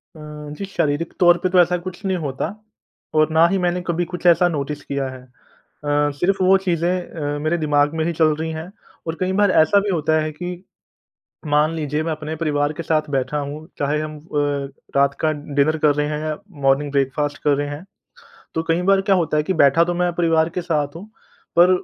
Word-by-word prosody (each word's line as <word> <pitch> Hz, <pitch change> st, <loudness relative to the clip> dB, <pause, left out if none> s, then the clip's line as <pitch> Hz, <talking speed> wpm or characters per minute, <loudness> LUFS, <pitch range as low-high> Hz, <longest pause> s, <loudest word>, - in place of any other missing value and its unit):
अ, -, -, -12 dB, 0.4 s
जी, 200 Hz, -, -4 dB
शारीरिक 165 Hz, -4 st, -1 dB
तौर 175 Hz, -2 st, +6 dB
पे 185 Hz, -, +2 dB
तो 185 Hz, 0 st, +4 dB
ऐसा 180 Hz, 0 st, +4 dB
कुछ 185 Hz, +2 st, -8 dB
नहीं 190 Hz, -1 st, 0 dB
होता, 140 Hz, -6 st, -3 dB, 0.7 s
और 155 Hz, 0 st, +3 dB
ना 160 Hz, +1 st, +5 dB
ही 195 Hz, +3 st, 0 dB
मैंने 180 Hz, -1 st, 0 dB
कभी 175 Hz, 0 st, 0 dB
कुछ 180 Hz, +1 st, -8 dB
ऐसा 175 Hz, +1 st, +5 dB
नोटिस 145 Hz, -2 st, -3 dB
किया 140 Hz, -1 st, -2 dB
है। 130 Hz, -1 st, -9 dB
अ, 145 Hz, +3 st, -4 dB
सिर्फ़ 190 Hz, +2 st, +1 dB
वो 190 Hz, +1 st, +6 dB
चीज़ें 175 Hz, -3 st, 0 dB, 0.5 s
अ, -, -, -4 dB
मेरे 155 Hz, +3 st, 0 dB
दिमाग 145 Hz, -2 st, +2 dB
में 160 Hz, -, 0 dB
ही 170 Hz, -, -1 dB
चल 155 Hz, -1 st, +3 dB
रही 160 Hz, +1 st, -3 dB
हैं। 160 Hz, +3 st, -6 dB, 0.4 s
और 160 Hz, -, -2 dB
कई 185 Hz, 0 st, 0 dB
बार 205 Hz, 0 st, +3 dB
ऐसा 185 Hz, +6 st, +5 dB
भी 200 Hz, +1 st, -2 dB
होता 160 Hz, -4 st, +1 dB
है 155 Hz, 0 st, -2 dB
कि 180 Hz, +3 st, -7 dB, 0.8 s
मान 150 Hz, +2 st, +2 dB
लीजिए, 150 Hz, -1 st, -2 dB
मैं 160 Hz, 0 st, -2 dB
अपने 155 Hz, 0 st, -5 dB
परिवार 145 Hz, -2 st, 0 dB
के 170 Hz, -, -6 dB
साथ 155 Hz, -2 st, 0 dB
बैठा 135 Hz, +2 st, -1 dB
हूँ, 145 Hz, +2 st, -6 dB
चाहे 145 Hz, +1 st, 0 dB
हम 155 Hz, 0 st, -5 dB
अ, 155 Hz, +3 st, -20 dB, 0.7 s
रात 140 Hz, 0 st, +3 dB
का 155 Hz, -1 st, +2 dB
डिनर 145 Hz, +1 st, 0 dB
कर 150 Hz, -1 st, +3 dB
रहे 150 Hz, 0 st, 0 dB
हैं 150 Hz, 0 st, -2 dB
या 155 Hz, 0 st, -3 dB, 0.3 s
मॉर्निंग 140 Hz, +2 st, +3 dB
ब्रेकफ़ास्ट 140 Hz, +1 st, 0 dB
कर 145 Hz, -1 st, +4 dB
रहे 145 Hz, +1 st, -2 dB
हैं। 145 Hz, +4 st, -7 dB, 0.7 s
तो 160 Hz, -, 0 dB
कई 165 Hz, +2 st, +2 dB
बार 195 Hz, 0 st, +5 dB
क्या 195 Hz, 0 st, +3 dB
होता 165 Hz, -3 st, 0 dB
है 150 Hz, -, +3 dB
कि 170 Hz, -, -1 dB
बैठा 140 Hz, +4 st, +5 dB
तो 175 Hz, +1 st, -2 dB
मैं 175 Hz, 0 st, 0 dB
परिवार 165 Hz, -2 st, +2 dB
के -, -, +1 dB
साथ 150 Hz, -3 st, -1 dB
हूँ, 185 Hz, +5 st, -9 dB, 0.5 s
पर 175 Hz, +2 st, +7 dB
155 Hz, 215 wpm, -21 LUFS, 145-175 Hz, 0.8 s, पर